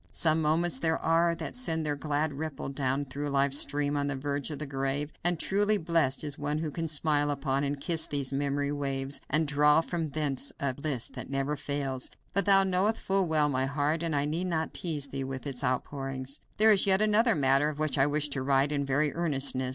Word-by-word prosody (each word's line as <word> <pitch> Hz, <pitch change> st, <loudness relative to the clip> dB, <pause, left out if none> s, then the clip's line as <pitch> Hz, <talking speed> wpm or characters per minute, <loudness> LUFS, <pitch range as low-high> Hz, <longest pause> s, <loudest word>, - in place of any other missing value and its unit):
Some 160 Hz, -1 st, +2 dB
moments 165 Hz, +3 st, +2 dB
there 160 Hz, -1 st, +1 dB
are, 170 Hz, +1 st, +2 dB
that 165 Hz, +5 st, -6 dB
send 160 Hz, -11 st, 0 dB
their 145 Hz, -1 st, 0 dB
glad 150 Hz, +1 st, -1 dB
ripple 145 Hz, -1 st, -5 dB
down 135 Hz, 0 st, -1 dB
through 145 Hz, +2 st, -5 dB
life's 140 Hz, 0 st, +4 dB
stream 145 Hz, 0 st, 0 dB
to 145 Hz, -1 st, 0 dB
the 140 Hz, -1 st, -2 dB
verge 140 Hz, +2 st, -3 dB
of 150 Hz, -, -5 dB
the 150 Hz, -, -5 dB
grave, 135 Hz, +2 st, -2 dB
and 175 Hz, -1 st, +2 dB
truly 205 Hz, +4 st, +2 dB
blest 160 Hz, -7 st, +1 dB
is 145 Hz, -2 st, -4 dB
one 145 Hz, +1 st, -1 dB
who 155 Hz, -1 st, -3 dB
can 165 Hz, +2 st, -3 dB
smile 150 Hz, -1 st, +2 dB
upon 140 Hz, -1 st, -1 dB
and 140 Hz, 0 st, -2 dB
kiss 165 Hz, +2 st, 0 dB
these 140 Hz, -2 st, -2 dB
memory 140 Hz, +1 st, -1 dB
waves, 135 Hz, -1 st, -3 dB
and 155 Hz, +2 st, +2 dB
draw 150 Hz, +1 st, +4 dB
from 165 Hz, -1 st, -3 dB
thence 140 Hz, -2 st, -1 dB
a 140 Hz, -2 st, -1 dB
bliss 140 Hz, -3 st, -3 dB
that -, -, -8 dB
never 135 Hz, +2 st, -1 dB
fails. 140 Hz, -3 st, -3 dB, 0.2 s
But 200 Hz, -, +1 dB
thou 195 Hz, -1 st, +6 dB
knowest 190 Hz, +4 st, +1 dB
full 195 Hz, -1 st, 0 dB
well 155 Hz, -2 st, +3 dB
my 130 Hz, -2 st, 0 dB
heart, 145 Hz, +3 st, 0 dB
and 165 Hz, -3 st, -1 dB
I 140 Hz, 0 st, +1 dB
need 165 Hz, +5 st, -2 dB
not 160 Hz, -2 st, -2 dB
tease 150 Hz, -5 st, -2 dB
thee 135 Hz, 0 st, -4 dB
with 130 Hz, 0 st, -6 dB
its 135 Hz, -2 st, -4 dB
outpourings. 135 Hz, +1 st, -3 dB, 0.2 s
"There 220 Hz, +1 st, +6 dB
is 200 Hz, -1 st, +3 dB
yet 195 Hz, +2 st, +4 dB
another 215 Hz, +1 st, +3 dB
matter 135 Hz, 0 st, +3 dB
of 150 Hz, -, -6 dB
which 155 Hz, -2 st, 0 dB
I 135 Hz, -, +5 dB
wish 150 Hz, 0 st, +1 dB
to 135 Hz, -1 st, -2 dB
write 135 Hz, +1 st, +2 dB
in 145 Hz, -1 st, 0 dB
very 140 Hz, +2 st, 0 dB
earnestness. 140 Hz, -6 st, -1 dB
145 Hz, 220 wpm, -29 LUFS, 140-160 Hz, 0.2 s, thou